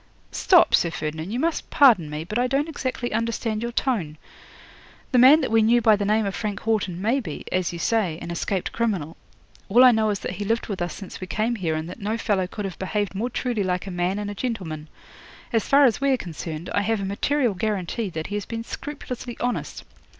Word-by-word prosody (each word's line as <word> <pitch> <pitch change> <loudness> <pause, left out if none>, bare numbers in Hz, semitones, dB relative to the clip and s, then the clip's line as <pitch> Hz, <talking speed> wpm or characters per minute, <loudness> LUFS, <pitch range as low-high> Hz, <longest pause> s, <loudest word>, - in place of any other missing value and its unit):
'"Stop, 360 -3 +4
Sir 170 - +4
Ferdinand, 160 +1 -4
you 235 +4 -2
must 330 +3 -1
pardon 225 - +5
me; 150 +1 -4
but 210 +8 -3
I 250 - +2
don't 275 +4 0
exactly 255 -6 -3
understand 225 -1 -1
your 235 0 -3
tone. 210 - -1 0.9
The 250 - +4
man 275 +6 +8
that 260 - -2
we 225 0 +5
knew 230 +2 +4
by 220 -2 +5
the 205 0 -2
name 215 +1 +2
of 195 - -2
Frank 205 -2 -3
Haughton 205 -6 -1
may 230 +8 +1
be, 165 - -7
as 185 -2 0
you 170 - -6
say, 185 -3 0
an 170 - -6
escaped 180 +2 -2
criminal. 195 -9 -2 0.5
All 240 +6 +6
I 255 - +9
know 220 -2 +2
is 205 - 0
that - - -3
he 205 - -3
lived 225 +3 0
with 195 -4 -3
us 175 - -2
since 195 -2 -9
we 185 - -5
came 220 +5 0
here, 170 -7 -1
and 155 +1 -3
that 180 - -9
no 215 +3 -2
fellow 195 -5 0
could 205 +2 -5
have 190 - -6
behaved 205 +1 -2
more 220 +6 -2
truly 245 -3 -2
like 180 -1 -1
a 195 - -6
man 180 +2 -1
and 205 0 -3
a - - -5
gentleman. 185 -10 -4 0.7
As 225 - +1
far 280 +1 +6
as 245 0 +2
we 275 - +2
are 265 - +3
concerned, 165 -3 -6
I 200 - +2
have 220 +1 0
a 195 - -3
material 240 +5 +1
guarantee 205 +2 -2
that 160 -2 -5
he - - -6
has 205 - -4
been 230 0 -4
scrupulously 250 -3 -7
honest. 245 0 -3
210 Hz, 230 wpm, -24 LUFS, 185-240 Hz, 0.9 s, I